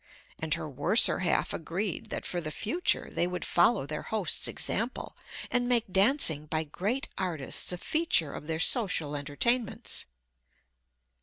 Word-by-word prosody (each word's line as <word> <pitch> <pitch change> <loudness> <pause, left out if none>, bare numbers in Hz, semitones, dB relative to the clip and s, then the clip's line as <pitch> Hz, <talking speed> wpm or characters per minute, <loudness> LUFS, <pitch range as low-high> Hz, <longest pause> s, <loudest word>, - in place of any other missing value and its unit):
And 160 -1 0
her 165 -2 -6
worser 150 - +5
half 185 - 0
agreed 175 +3 -4
that - - -5
for 175 - -3
the 155 - -5
future 225 - -1
they 175 - 0
would 180 0 -4
follow 175 - +2
their 150 +1 -5
host's 205 -7 -1
example, 230 +4 -2 0.4
and 245 0 +1
make 230 -6 +1
dancing 190 - +5
by 160 +1 -1
great 205 - -3
artists 170 -7 -1
a 180 - -3
feature 245 - 0
of 150 - -9
their 160 -1 -2
social 165 - 0
entertainments. 200 - -1
180 Hz, 145 wpm, -28 LUFS, 155-230 Hz, 0.4 s, worser